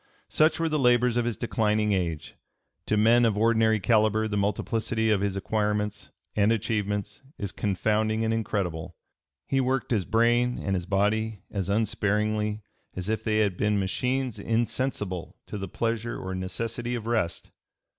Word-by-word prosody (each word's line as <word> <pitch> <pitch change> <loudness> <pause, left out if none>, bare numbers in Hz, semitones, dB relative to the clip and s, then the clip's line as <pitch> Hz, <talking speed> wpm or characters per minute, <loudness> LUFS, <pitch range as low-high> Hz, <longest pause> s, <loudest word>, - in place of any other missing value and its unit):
Such 155 +2 +3
were 165 - +1
the 155 -1 0
labors 125 -1 +4
of 120 -1 +1
his 120 -3 -2
declining 105 -2 +1
age. 85 -5 -2 0.5
To 105 - +2
men 115 +3 +5
of 110 -3 +2
ordinary 110 0 +3
calibre 110 0 +2
the 105 - -3
multiplicity 110 +2 0
of 100 -2 +2
his 100 -1 -1
acquirements 105 +1 -1 0.3
and 105 +1 +3
achievements 105 -2 -2 0.2
is 100 -2 -4
confounding 110 +2 0
and 110 - +1
incredible. 90 -6 -2 0.5
He 135 -1 +1
worked 130 0 -1
his 105 -6 +1
brain 120 +4 +2
and 95 - -1
his 90 -1 -3
body 105 +1 0
as 100 -2 -3
unsparingly 105 0 0 0.3
as 95 +2 -4
if 110 0 -1
they 110 -1 +1
had 100 -4 +1
been 105 0 +1
machines 125 +4 -1
insensible 110 -4 -2
to 105 - -6
the 95 - -4
pleasure 115 +3 -2
or 95 0 -5
necessity 115 +6 -3
of 115 -2 -5
rest. 110 -8 -1
110 Hz, 155 wpm, -27 LUFS, 100-115 Hz, 0.5 s, men